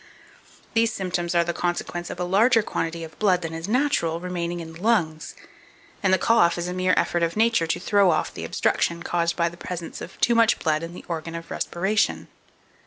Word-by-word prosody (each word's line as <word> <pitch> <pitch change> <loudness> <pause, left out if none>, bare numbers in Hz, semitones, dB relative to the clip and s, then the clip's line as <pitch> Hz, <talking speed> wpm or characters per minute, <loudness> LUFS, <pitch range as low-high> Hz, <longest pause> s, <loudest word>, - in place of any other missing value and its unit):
These 230 -1 +3
symptoms 180 -4 -2
are 170 - +4
the 170 0 -2
consequence 175 0 -3
of - - -7
a - - 0
larger 220 +6 +4
quantity 165 -3 -3
of 160 -1 -11
blood 185 -4 +2
than 165 0 -4
is 165 +2 -5
natural 220 - +1
remaining 175 -1 -3
in 165 -1 -8
the 165 - -12
lungs, 170 -8 0 0.7
and 195 - +2
the 190 - +5
cough 180 -4 +3
is 175 0 -3
a 180 - -3
mere 185 0 +2
effort 175 - +1
of 170 +3 0
Nature 225 -6 +3
to - - -1
throw 200 0 +3
off 160 - 0
the - - -7
obstruction 170 0 0
caused 170 -1 0
by 170 -1 +1
the 170 +1 -7
presence 175 -1 -6
of - - -9
too 235 - +3
much 230 -1 +4
blood 155 -1 0
in 165 +1 -7
the - - -10
organ 165 -1 -4
of 165 0 -8
respiration. 195 +5 0
175 Hz, 210 wpm, -24 LUFS, 170-200 Hz, 0.7 s, the